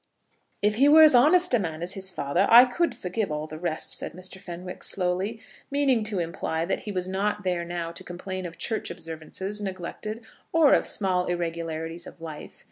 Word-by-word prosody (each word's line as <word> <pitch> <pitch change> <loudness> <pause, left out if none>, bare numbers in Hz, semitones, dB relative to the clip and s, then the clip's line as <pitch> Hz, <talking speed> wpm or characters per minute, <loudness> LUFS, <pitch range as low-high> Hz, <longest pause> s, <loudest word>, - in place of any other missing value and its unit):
"If 210 +1 +2
he 275 +3 +5
were 315 +1 +9
as 310 - +8
honest 310 +7 +5
a 245 - +4
man 165 -3 -4
as 180 +2 +1
his 190 -1 +1
father, 175 +2 0
I 240 +2 +10
could 260 +2 -1
forgive 200 -2 -3
all 150 0 -3
the 155 0 -9
rest," 165 -2 -1
said - - -3
Mr. 185 +2 -4
Fenwick 180 -1 -8
slowly, 190 +4 -1 0.3
meaning 275 -5 +2
to 210 -2 -1
imply 165 -1 -2
that 185 - -1
he 210 - -6
was 185 -2 -2
not 205 +2 -1
there 180 -2 -1
now 170 -1 -4
to 170 - -6
complain 185 +1 -6
of 170 - -12
church 220 - -2
observances 165 +6 -6
neglected, 205 +4 -6 0.3
or 320 -4 +5
of - - +3
small 185 -3 +1
irregularities 165 -1 -4
of - - -13
life. 160 -2 -9
185 Hz, 195 wpm, -26 LUFS, 170-215 Hz, 0.3 s, I